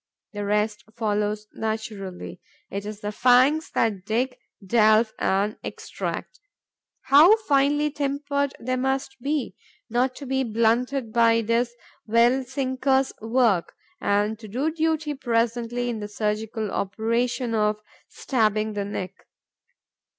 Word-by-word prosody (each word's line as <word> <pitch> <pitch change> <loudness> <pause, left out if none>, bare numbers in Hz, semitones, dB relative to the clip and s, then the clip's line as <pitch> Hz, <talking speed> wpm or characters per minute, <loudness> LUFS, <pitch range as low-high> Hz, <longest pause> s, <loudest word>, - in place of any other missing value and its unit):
The 205 0 -4
rest 210 +1 0
follows 210 -1 -1
naturally; 215 -4 -5 0.3
it 200 +1 -4
is 210 0 -7
the 210 - -3
fangs 255 +7 +4
that 205 -5 +1
dig, 245 +5 -1 0.3
delve 220 +1 +4
and 200 +3 +1
extract. - - -5 0.6
How 310 +11 +7
finely 290 +1 +3
tempered 285 -1 -1
they 255 +2 -2
must 265 +1 -1
be, 285 0 -2 0.4
not 250 +2 +1
to 280 - -8
be 265 0 0
blunted 235 +2 0
by 230 -1 +4
this 235 +2 0 0.3
well 235 +4 +4
sinker's 265 +1 0
work 225 -6 +1 0.3
and 205 +2 +1
to 220 - -10
do 260 +10 -1
duty 320 -1 0
presently 240 -1 -1
in 235 -2 -2
the 210 - -5
surgical 215 0 -2
operation 230 +4 -1
of 210 -1 +1 0.3
stabbing 215 -4 0
the 205 -1 -2
neck! 195 -1 -6
230 Hz, 120 wpm, -24 LUFS, 215-265 Hz, 0.6 s, How